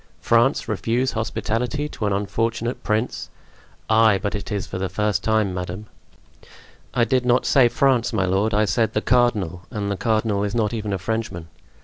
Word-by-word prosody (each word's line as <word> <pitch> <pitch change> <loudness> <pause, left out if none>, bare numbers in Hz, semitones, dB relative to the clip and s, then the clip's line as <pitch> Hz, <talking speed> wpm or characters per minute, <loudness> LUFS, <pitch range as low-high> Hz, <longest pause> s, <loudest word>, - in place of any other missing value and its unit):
France 120 +4 +2
refuse 115 +5 0
hospitality 115 +5 -2
to 110 -7 -4
an - - 0
unfortunate 115 +4 -2
prince? 110 +3 -2 0.6
Ay, 110 -2 +5
but 100 - -3
it 100 +2 -5
is 100 -2 -2
for 95 - -6
the 95 0 -2
first 105 +1 -1
time, 110 -3 +1
madame!" 90 +3 -5 1.1
"I 120 - +2
did 130 +1 +1
not 125 0 +2
say 130 -3 +5
France, 125 -1 +2
my 95 -5 +1
lord; 95 +4 +1
I 105 0 +2
said 110 +2 0
the 105 - 0
cardinal, 105 -10 +1
and 105 -4 -3
the 100 - -2
cardinal 110 -2 0
is 105 +2 -2
not 110 -2 0
even 105 -2 -3
a 100 - 0
Frenchman." 95 -4 -4
110 Hz, 175 wpm, -22 LUFS, 100-120 Hz, 1.1 s, Ay